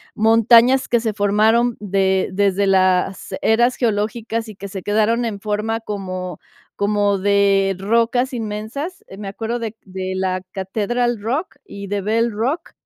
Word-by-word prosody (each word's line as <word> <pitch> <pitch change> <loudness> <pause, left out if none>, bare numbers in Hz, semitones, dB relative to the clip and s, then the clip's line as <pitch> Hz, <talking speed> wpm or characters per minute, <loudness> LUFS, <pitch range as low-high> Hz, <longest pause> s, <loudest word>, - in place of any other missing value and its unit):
montañas 230 +4 +5
que 235 - +2
se 220 -2 -2
formaron 220 +4 +2
de 190 -2 +1
desde 200 0 +1
las 190 0 +1
eras 240 +3 +3
geológicas 225 0 -1
y 215 - -10
que 200 0 -8
se 190 -1 -6
quedaron 220 +3 +1
en 205 -3 -4
forma 215 +2 -1
como 185 -5 -5 0.4
como 205 -1 +1
de 195 -1 +2
rocas 235 +5 +1
inmensas. 235 - -5
Me 205 -1 -7
acuerdo 225 +4 -3
de 225 -1 -3
c - - -34
de 185 0 -5
la 185 -1 -1
Catedral 220 +4 -1
Rock 265 - -3
y 200 - -8
de 200 0 -2
Bell 225 +3 +1
Rock, 245 +10 -2
210 Hz, 150 wpm, -20 LUFS, 195-230 Hz, 0.4 s, montañas